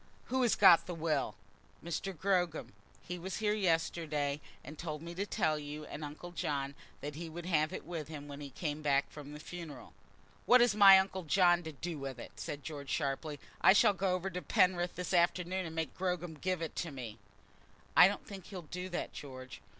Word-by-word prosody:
Who 260 +1 +1
has 240 -3 +3
got 170 - +7
the 175 - -4
will?" 155 -8 -1 0.5
"Mr. 170 +3 -3
Gogram. 180 -2 0 0.3
He 180 0 -5
was 190 +2 -4
here 210 -1 +1
yesterday, 165 -6 0 0.2
and 150 - -9
told 155 -2 -5
me 170 +1 -6
to 200 +4 -3
tell 155 -4 +1
you 150 +1 -7
and 150 - -7
uncle 150 +4 -7
John 140 -4 -2 0.3
that 145 +1 -5
he 165 +2 -6
would 170 +2 -7
have 155 -3 +2
it - - -6
with 165 -4 -5
him 150 -2 -8
when 145 0 -8
he 140 - -6
came 150 +2 -4
back 140 -2 +2
from 145 -1 -9
the 150 - -8
funeral." 165 -1 -9 0.5
"What 250 - +8
has 240 -2 +5
my 200 -2 +9
uncle 190 0 0
John 175 +1 +4
to 160 -2 -6
do 160 +2 -5
with 135 -2 -5
it?" - - -9
said 145 -1 -5
George, 145 -3 -7
sharply. 145 0 -2 0.2
"I - - +8
shall 210 0 +5
go 190 0 0
over 185 +1 -3
to 180 +1 -4
Penrith 180 +2 +2
this 180 +1 -4
afternoon 180 +1 +2
and 160 - -8
make 160 -1 -2
Gogram 180 -2 -2
give 180 +2 -2
it 160 - -3
up - - -31
to 170 - -2
me." 120 -6 -7 0.8
"I 180 - +10
don't 200 - -3
think 195 -3 -9
he'll 185 -4 -7
do 180 +4 -6
that, 175 - -4
George." 130 -2 -9
165 Hz, 210 wpm, -33 LUFS, 150-180 Hz, 0.8 s, I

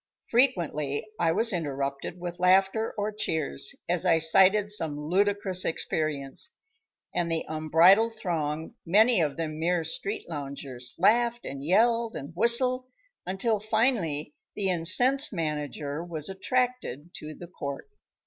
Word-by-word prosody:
Frequently 170 - 0
I 165 -1 +2
was 220 +5 +4
interrupted 140 0 -4
with 175 0 -6
laughter 195 +4 +2
or 210 +1 -2
cheers, 160 - 0
as - - -1
I 165 - +4
cited 190 +6 +4
some 160 -8 0
ludicrous 190 +3 +1
experience, 150 -4 -1 0.6
and 170 -1 -1
the 165 -1 -1
unbridled 170 +9 +4
throng, 160 -6 -3
many 215 +4 +4
of 145 -3 -1
them 155 -2 -4
mere 170 +1 0
street 195 +6 -4
loungers, 140 -5 -4
laughed 235 +6 +2
and 135 0 -6
yelled 230 +6 +2
and 145 +4 -8
whistled 250 +5 +2 0.4
until, 205 +4 0
finally, 210 - 0 0.2
the 195 -2 0
incensed 245 - +3
manager 150 -2 -4
was 160 -3 -3
attracted 195 - -2
to 155 0 -9
the 175 - -10
Court. 145 - -7
175 Hz, 130 wpm, -27 LUFS, 155-215 Hz, 0.6 s, was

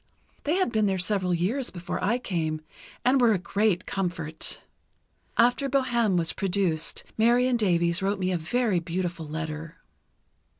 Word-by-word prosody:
They 305 +4 +2
had 375 -9 +1
been 215 -2 +2
there 190 -1 +1
several 185 0 +1
years 205 +10 0
before 175 -1 -5
I 235 +4 +2
came, 160 -9 -2 0.4
and 255 +1 +4
were 235 -2 +5
a - - +2
great 200 0 0
comfort. 170 -5 -3 0.7
After 245 +4 +3
'Bohême' 240 -7 +2
was 165 -2 0
produced, 180 -5 0 0.2
Marion 245 +3 +4
Davies 175 -5 +2
wrote 200 +1 0
me 185 -1 -1
a 180 - +1
very 215 +3 +1
beautiful 170 -1 -3
letter." 160 +1 -5
190 Hz, 145 wpm, -26 LUFS, 170-235 Hz, 0.7 s, were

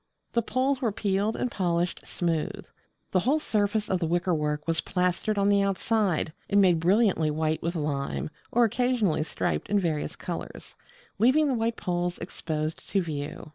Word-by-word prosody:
The 235 - +3
poles 260 +4 0
were 230 -4 +1
peeled 200 +1 0
and 250 - -2
polished 175 -2 -1
smooth. 165 -3 -2 0.5
The 185 - +3
whole 265 - +2
surface 210 -5 0
of 185 - 0
the 165 - 0
wickerwork 155 -3 0
was 165 -3 +1
plastered 180 +3 0
on 200 0 +3
the 200 0 +4
outside, 195 -4 +1 0.2
and 205 0 +4
made 180 -4 +5
brilliantly 185 -2 +3
white 155 +1 0
with 170 +1 -2
lime, 145 -1 -2 0.2
or 240 - +4
occasionally 235 -7 +1
striped 155 - -2
in 205 - +3
various 155 -4 -1
colours; 175 -2 -7 0.4
leaving 260 +8 +5
the 275 - +1
white 230 -1 0
poles 175 0 -1
exposed 155 -1 -4
to 195 - +2
view. 150 -3 -5
185 Hz, 165 wpm, -27 LUFS, 165-215 Hz, 0.5 s, made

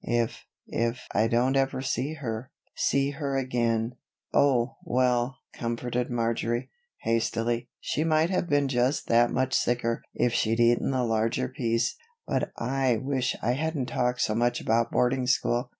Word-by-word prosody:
If 120 -1 -1 0.2
if 115 +2 -2
I 110 +2 +3
don't 120 +4 +2
ever 135 -1 +1
see 135 +3 -2 0.6
see 140 0 +1
her 140 -1 -2
again 120 -2 0 0.2
" - - -49
"Oh, 130 -4 +3
well," 125 0 +1 0.2
comforted 120 +1 -2
Marjory, 115 0 -1 0.3
hastily, 115 +1 0
"she 155 - -1
might 160 +2 +2
have 180 -2 0
been 145 -1 +3
just 130 +2 +1
that 120 +1 +5
much 130 +1 0
sicker 115 -1 +1
if 120 - +1
she'd 115 +1 +1
eaten 120 0 +3
the 130 -2 +1
larger 110 - 0
piece. 115 - -1 0.3
But - - -1
I 130 -1 +1
wish 130 +1 -1
I 120 - +2
hadn't 140 -1 -1
talked 125 +1 0
so 105 - +1
much 120 +2 +1
about 115 +1 +1
boarding 125 +1 +1
school. 125 -1 +1
120 Hz, 150 wpm, -27 LUFS, 115-135 Hz, 0.6 s, that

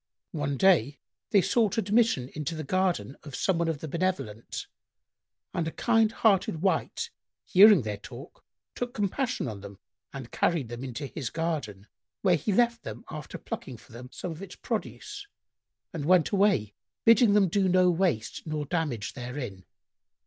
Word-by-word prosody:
One 145 -3 -2
day 145 - +4 0.3
they 200 -3 +4
sought 215 +2 +2
admission 210 - +2
into 155 +2 -4
the 155 - -4
garden 185 -3 0
of 145 -4 -9
some 185 -3 +1
one 170 - +1
of 160 -3 -2
the 160 - -5
benevolent, 165 - -3 0.9
and 170 -3 -1
a - - -2
kind 225 +2 +2
hearted 195 -7 +2
wight, 195 - 0 0.3
hearing 200 - +7
their 105 -1 -3
talk, 125 - -12 0.3
took 245 +1 -4
compassion 230 - -1
on 105 -4 -6
them 100 0 -10 0.3
and 135 -4 -8
carried 155 -9 0
them 120 +2 -6
into 135 +2 -5
his 135 -3 -5
garden, 145 - -3 0.4
where 180 -2 +5
he 160 +6 -1
left 235 +2 +2
them 235 - -8
after 155 -1 -7
plucking 130 -3 -7
for - - -19
them 125 +2 -10
some 180 - -5
of 160 +2 -8
its 195 -2 -8
produce 410 0 -5 0.7
and 155 -4 -4
went 180 0 +4
away, 195 - +2 0.3
bidding 230 -2 +6
them 205 -2 +5
do 190 +2 +1
no 180 0 +5
waste 165 - 0
nor 155 -1 -2
damage 145 -10 -2
therein. 120 -7 -6
165 Hz, 165 wpm, -28 LUFS, 130-195 Hz, 0.9 s, hearing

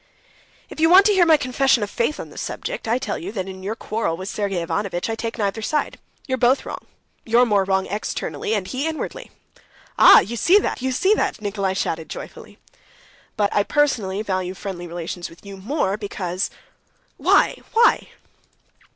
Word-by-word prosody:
"If - - -11
you 325 +1 +4
want 380 +3 +8
to 420 - +4
hear 360 -3 +4
my 320 -1 +6
confession 265 -3 +2
of 205 - -3
faith 235 +6 -1
on - - -7
the - - -14
subject, - - -5
I 230 +2 +2
tell 215 -5 -3
you 185 +4 -6
that 190 -4 -3
in 190 0 -8
your 205 +4 -3
quarrel 215 -7 -2
with 190 +2 -6
Sergey 200 -3 -2
Ivanovitch 190 +3 -2
I - - -1
take 225 +1 -5
neither 205 0 -1
side. 300 +7 -2 0.3
You're 260 -2 -2
both 250 +3 +3
wrong. - - -7 0.4
You're 235 +2 +4
more 205 -4 +2
wrong 190 0 +1
externally, 210 +1 -3
and 200 -3 -2
he 265 +8 -2
inwardly." 320 +10 -5 0.7
"Ah, - - +10
ah! - - +9
You 235 +3 -5
see 350 - +5
that, 415 - -1
you 260 +1 -1
see 380 +11 +3
that!" 410 - -1
Nikolay 200 -2 -2
shouted 160 -4 -2
joyfully. - - -9 0.8
"But 205 -2 +1
I 205 - +3
personally 215 -7 0
value 185 -2 -2
friendly 180 -2 -6
relations 175 +1 -6
with 165 +4 -18
you 200 0 -8
more 205 -1 -1
because...." 190 -3 -3 0.7
"Why, - - +3 0.2
why?" 465 0 +4
210 Hz, 185 wpm, -22 LUFS, 190-265 Hz, 0.8 s, Ah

